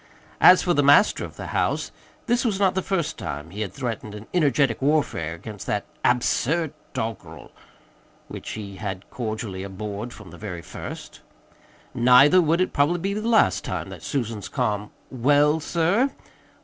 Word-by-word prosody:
As 180 0 +7
for 175 - +2
the 145 - +3
master 145 +8 +5
of - - -8
the - - -7
house - - 0 0.3
this 240 0 +1
was 220 -6 0
not 195 -2 +3
the 190 - 0
first 175 -4 -2
time 75 +3 -6
he 105 +3 -6
had 105 - -3
threatened 115 -5 -5
an 105 +1 -9
energetic 140 -8 +2
warfare 135 - 0
against 105 +3 -9
that 105 - -1 0.2
"absurd 140 +6 +1 0.2
doggerel" 110 -2 -6 0.8
(which - - -8
he 100 -3 -7
had 95 -1 -5
cordially 110 -5 -4
abhorred 100 +4 -6
from 105 -5 -12
the - - -12
very 90 -6 -6
first); - - -9 0.7
neither 130 +8 +6
would 165 +2 +2
it 185 - 0
probably 145 +5 +2
be 195 +3 -2
the 215 +2 -3
last 230 -2 +3
time - - -4
that - - -9
Susan's 115 -7 -3
calm 105 -6 -1 0.2
"Well, 145 +4 +3
sir?" 175 - +1
125 Hz, 160 wpm, -24 LUFS, 105-165 Hz, 0.8 s, As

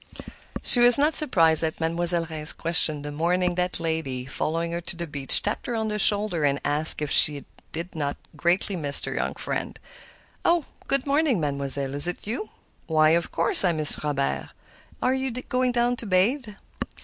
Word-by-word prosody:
She 245 - +4
was 240 0 +10
not 295 +3 0
surprised 165 - +2
at 160 -1 -5
Mademoiselle 170 +1 +3
Reisz's 155 -1 +1
question 160 -3 +1
the 145 - -8
morning 180 +4 -3
that 180 0 -4
lady, 160 -6 -6
following 165 +5 -5
her 170 0 -6
to 175 - -9
the 170 0 -7
beach, 140 -3 -1
tapped 210 +6 -6
her 240 - -5
on 220 -1 -4
the 210 0 -5
shoulder 205 -5 0
and 140 -1 -1
asked 150 +1 +6
if 150 - -6
she 145 -2 +4 0.3
did 170 +3 -9
not 145 -3 -6 0.2
greatly 175 +5 -3
miss 145 -4 +3
her - - -7
young - - -5
friend. - - -7 0.7
"Oh, 340 -4 -1 0.2
good 275 -1 -2
morning, 285 - -1
Mademoiselle; 140 -2 -5
is 145 +4 +7
it 175 - -8
you? 240 - -7 0.4
Why, 155 -1 +1
of 170 +1 -2
course 165 - -1
I 180 -2 0
miss 155 -1 +5
Robert. 145 -2 -4 0.5
Are 255 - 0
you 265 0 -4
going 250 +1 -4
down 240 0 -2
to 230 - -9
bathe?" 215 +8 -1
170 Hz, 185 wpm, -22 LUFS, 150-220 Hz, 0.7 s, was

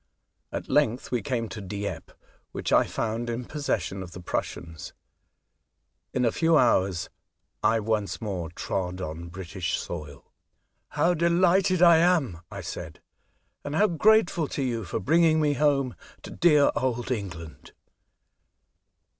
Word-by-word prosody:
At - - -5
length 120 +4 +1
we 120 -2 0
came 125 -5 -2
to 110 - -7
Dieppe, 100 +1 -5 0.4
which - - -2
I - - +5
found 115 +1 -3
in 120 +1 -3
possession 140 -10 -2
of 90 -2 -9
the 90 - -8
Prussians. 80 -2 -5 1.2
In 125 -1 0
a 115 - +3
few 165 +3 +3
hours 95 - +2 0.5
I 115 - +3
once 105 -1 -1
more 95 -7 -4
trod 90 +1 -3
on 85 -1 -6
British 90 0 -4
soil. 75 -5 -8 0.3
" - - -49
How 175 +2 +4
delighted 180 +2 +3
I 170 -2 +8
am," 160 - +2
I - - -7
said, - - -7 0.3
'' - - -46
and 145 - -4
how 205 - +4
grateful 175 -2 +3
to 140 - -3
you 115 -5 -2
for - - -3
bringing 160 - +3
me 150 -2 +2
home 140 -3 +1 0.3
to - - -9
dear 150 -4 +4
old 120 0 -1
England 85 -8 -6
120 Hz, 145 wpm, -26 LUFS, 95-155 Hz, 1.2 s, I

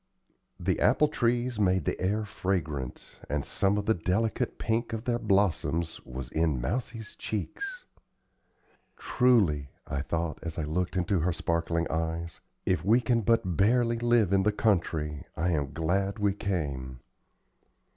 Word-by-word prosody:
The - - 0
apple 150 - +4
trees 120 -3 0
made 95 -2 +2
the - - -2
air 105 +4 0
fragrant, 80 -11 -3
and 75 0 -1
some 100 0 +1
of 100 - -2
the 110 - +4
delicate 100 +4 -1
pink 115 +1 -1
of 110 0 -3
their 120 -1 0
blossoms 95 -6 +1
was 65 -1 -7
in 80 -4 +1
Mousie's 110 - -3
cheeks. 400 - -4 1.1
"Truly," 100 - +3 0.2
I 70 - -2
thought, 85 +1 -2
as 80 -1 -5
I 80 - -1
looked 90 +5 -1
into 90 +1 +1
her 85 +3 +1
sparkling 85 0 0
eyes, 80 +1 -2 0.3
"if 95 - +1
we 110 +6 +5
can 120 -1 +1
but 110 -5 +2
barely 115 +4 +3
live 120 -5 +3
in 95 - +4
the 105 +2 +3
country, 80 -8 0
I 85 +1 +1
am 70 -4 -1
glad 95 +7 0
we 100 -2 +2
came." 70 -10 -3
95 Hz, 145 wpm, -29 LUFS, 80-110 Hz, 1.1 s, we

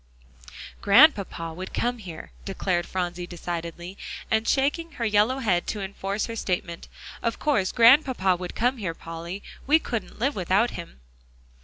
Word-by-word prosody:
"Grandpapa 200 - +4
would 185 +3 -7
come 245 0 0
here," 175 -6 -9
declared 185 -3 -1
Phronsie 180 -1 -3
decidedly, 175 +1 -6 0.3
and 220 +1 +2
shaking 295 +4 +1
her 235 - -3
yellow 215 +4 +3
head 190 -9 +1
to 210 - -3
enforce 195 +1 -3
her 230 - -6
statement. 180 -5 -3 0.3
"Of 230 - -1
course 215 -11 +1
Grandpapa 240 -6 +5
would 180 0 -7
come 250 +3 +1
here, 185 -7 -3
Polly. 170 +4 -7 0.2
We 300 +3 +6
couldn't 235 -8 -5
live 270 +6 +1
without 195 +5 +2
him." 170 - -9
195 Hz, 145 wpm, -25 LUFS, 175-235 Hz, 0.3 s, We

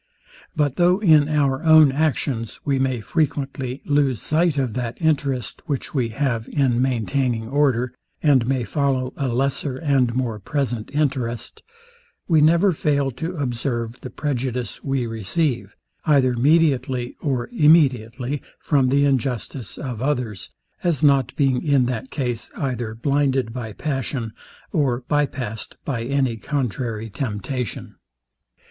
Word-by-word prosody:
But 145 -3 0
though 180 +1 +4
in 155 -7 +5
our 140 -2 +1
own 155 -3 +7
actions 135 -6 -1
we 140 -2 +1
may 130 -3 0
frequently 135 -2 -2
lose 140 -5 +2
sight 160 +2 +1
of 130 -5 0
that 120 -1 -4
interest, 140 -6 0
which 140 -4 -3
we 125 -5 0
have 115 -2 -2
in 125 -4 +1
maintaining 125 -2 0
order, 125 -3 +1 0.3
and 135 -6 +4
may 130 -2 +1
follow 130 +1 0
a 140 - -2
lesser 130 +2 -1
and 135 -5 +1
more 120 -4 -1
present 120 0 -2
interest, 130 -5 -2 0.7
we 160 -4 +4
never 170 +5 +5
fail 145 -4 0
to 160 +9 -5
observe 120 -4 -3
the 130 - -6
prejudice 125 -3 -3
we 135 -3 0
receive, 120 - -1 0.3
either 135 -4 +4
mediately 130 -3 +2
or 130 -5 -1
immediately, 135 - +3 0.2
from 140 -4 +2
the 140 +2 +3
injustice 130 -2 -2
of 125 -5 -5
others; 125 -8 -2 0.3
as 165 -6 +1
not 140 -4 +4
being 135 -4 +2
in 140 -4 +3
that 125 +1 -3
case 120 -6 -3
either 120 -5 -3
blinded 135 -1 +1
by 115 -3 -5
passion, 135 -3 -3 0.4
or 130 -6 +1
byassed 130 -6 -2
by 125 -5 -2
any 135 -3 0
contrary 115 -4 -3
temptation. 115 +1 -4
135 Hz, 130 wpm, -22 LUFS, 120-145 Hz, 0.7 s, own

